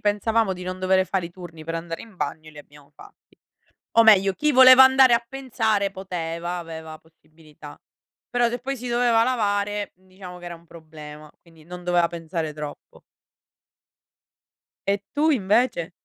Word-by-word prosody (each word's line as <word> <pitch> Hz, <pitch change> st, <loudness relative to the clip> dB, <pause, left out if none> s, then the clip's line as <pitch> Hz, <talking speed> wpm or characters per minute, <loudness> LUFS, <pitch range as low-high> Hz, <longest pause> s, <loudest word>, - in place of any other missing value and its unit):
pensavamo 210 Hz, 0 st, 0 dB
di 180 Hz, -1 st, -8 dB
non 185 Hz, 0 st, -6 dB
dovere 185 Hz, 0 st, +2 dB
fare 185 Hz, -2 st, -2 dB
i 170 Hz, -, -13 dB
turni 170 Hz, -3 st, -12 dB
per 165 Hz, +1 st, -5 dB
andare 165 Hz, 0 st, -6 dB
in 220 Hz, -4 st, -16 dB
bagno, 155 Hz, 0 st, -5 dB
e -, -, -14 dB
li 150 Hz, -, -14 dB
abbiamo 145 Hz, -1 st, -17 dB
fatti. -, -, -19 dB, 0.6 s
O 230 Hz, -, +8 dB
meglio, 195 Hz, -3 st, +5 dB
chi 300 Hz, +10 st, 0 dB
voleva 260 Hz, -1 st, +8 dB
andare 265 Hz, -1 st, +6 dB
a 235 Hz, 0 st, +1 dB
pensare 225 Hz, -6 st, -1 dB
poteva, 175 Hz, -2 st, -5 dB
aveva 160 Hz, -2 st, -9 dB
possibilità. 155 Hz, -2 st, -17 dB, 0.5 s
Però 245 Hz, -1 st, +1 dB
se 245 Hz, -, -4 dB
poi 270 Hz, +3 st, -5 dB
si 250 Hz, +1 st, -7 dB
doveva 235 Hz, -1 st, +2 dB
lavare, 205 Hz, -4 st, -1 dB
mhmm, 185 Hz, +1 st, -29 dB
diciamo 185 Hz, -1 st, -11 dB
che 175 Hz, -, -12 dB
era 175 Hz, -1 st, -7 dB
un 165 Hz, -, -20 dB
problema, 155 Hz, -2 st, -13 dB
quindi 165 Hz, -2 st, -21 dB
non 180 Hz, +1 st, -10 dB
doveva 175 Hz, -1 st, +2 dB
pensare 165 Hz, -2 st, -5 dB
troppo. 150 Hz, -1 st, -10 dB, 1.9 s
E 200 Hz, 0 st, +1 dB, 0.2 s
tu 310 Hz, +2 st, +2 dB
invece? 210 Hz, -, 0 dB
185 Hz, 170 wpm, -23 LUFS, 165-225 Hz, 1.9 s, O